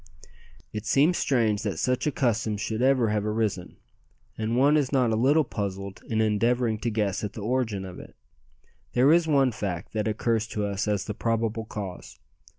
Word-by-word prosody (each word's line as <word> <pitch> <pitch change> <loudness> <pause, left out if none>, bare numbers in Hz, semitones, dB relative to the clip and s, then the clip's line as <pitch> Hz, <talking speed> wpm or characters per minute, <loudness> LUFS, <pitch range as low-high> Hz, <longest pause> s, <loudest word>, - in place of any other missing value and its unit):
It 105 -1 -5
seems 155 +6 +3
strange 110 -6 +1
that 105 -3 -3
such 125 +3 0
a - - +2
custom 115 -5 0
should 110 +2 -3
ever 130 -3 +3
have 105 -1 0
arisen, 105 -4 -2 0.6
and 110 +2 -1
one 140 +4 +5
is 145 -4 +1
not 130 -4 +2
a - - +2
little 140 +7 +4
puzzled 100 -5 -5
in 110 -1 0
endeavouring 110 +1 +1
to 120 - -1
guess 105 -3 -1
at 105 - -4
the 110 - -7
origin 110 -4 -1
of 90 -1 -9
it. - - -13 0.8
There 130 +5 +5
is 170 -1 +3
one 135 -4 +3
fact 95 -6 -5
that 110 -1 -1
occurs 110 +1 0
to 105 -2 -2
us 100 +1 -2
as 100 -2 0
the 105 - -4
probable 115 0 -1
cause. 100 -4 -7
110 Hz, 185 wpm, -26 LUFS, 105-125 Hz, 0.8 s, one